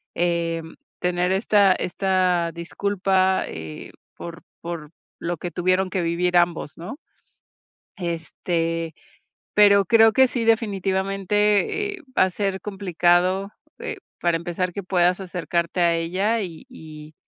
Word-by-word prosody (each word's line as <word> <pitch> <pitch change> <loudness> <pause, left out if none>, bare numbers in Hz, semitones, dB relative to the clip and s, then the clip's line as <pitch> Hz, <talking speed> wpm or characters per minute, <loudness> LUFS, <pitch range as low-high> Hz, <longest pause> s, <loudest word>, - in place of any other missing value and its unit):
em, 165 -1 -1 0.2
tener 180 +1 0
esta 200 0 +4
esta 180 -2 0
disculpa, 190 +2 0
eh, 80 -1 -8 0.2
por 170 0 -9 0.2
por 165 -3 -6 0.3
lo 170 0 -3
que 175 - -5
tuvieron 185 +2 +1
que 185 - -1
vivir 175 +1 +1
ambos, 170 -3 0
¿no? 175 - -7 1.0
Este, 165 -1 -2 0.6
pero 200 -1 +6
creo 225 +2 +6
que 260 +3 +6
sí, 245 -2 -2
definitivamente, 205 - +1
eh, 370 - -14 0.2
va - - +6
a 190 - -1
ser 195 0 -2
complicado, 185 0 +1 0.3
eh, - - -5 0.2
para 170 -1 +2
empezar 175 +1 -3
que 200 - -5
puedas 180 0 +2
acercarte 175 -1 -2
a 170 -1 +4
ella 190 +7 0
y 170 0 -7
y 155 -9 -12
180 Hz, 125 wpm, -23 LUFS, 170-195 Hz, 1.0 s, pero